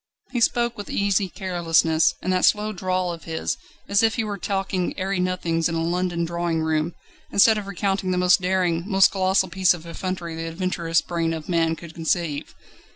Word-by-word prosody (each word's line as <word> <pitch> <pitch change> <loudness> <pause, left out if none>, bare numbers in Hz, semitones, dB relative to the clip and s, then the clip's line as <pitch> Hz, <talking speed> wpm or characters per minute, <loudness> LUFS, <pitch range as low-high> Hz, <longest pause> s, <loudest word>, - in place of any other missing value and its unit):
He 240 - -1
spoke 235 -1 +1
with 205 - -7
easy 200 -1 +1
carelessness, 165 -4 +2
and 185 - 0
that 185 - +1
slow 215 0 +2
drawl 185 -1 -1
of 165 - -11
his, 160 -1 -2 0.3
as 200 0 +3
if 225 -1 +2
he 225 - 0
were 205 -2 -4
talking 195 -2 -2
airy 190 0 -1
nothings 175 -2 0
in 165 - -2
a 165 - 0
London 175 0 -1
drawing 170 -1 -1
room, 160 +1 0 0.4
instead 215 +2 +5
of 200 - -8
recounting 195 0 -1
the 180 - 0
most 180 0 +4
daring, 180 -2 +1
most 195 -1 +5
colossal 190 0 +2
piece 185 0 +3
of 170 -1 -12
effrontery 170 0 -4
the 165 0 -4
adventurous 170 -1 0
brain 165 -1 -2
of 155 -1 -8
man 165 -2 +1
could 170 0 -11
conceive. 160 -2 -2
180 Hz, 190 wpm, -23 LUFS, 165-195 Hz, 0.4 s, instead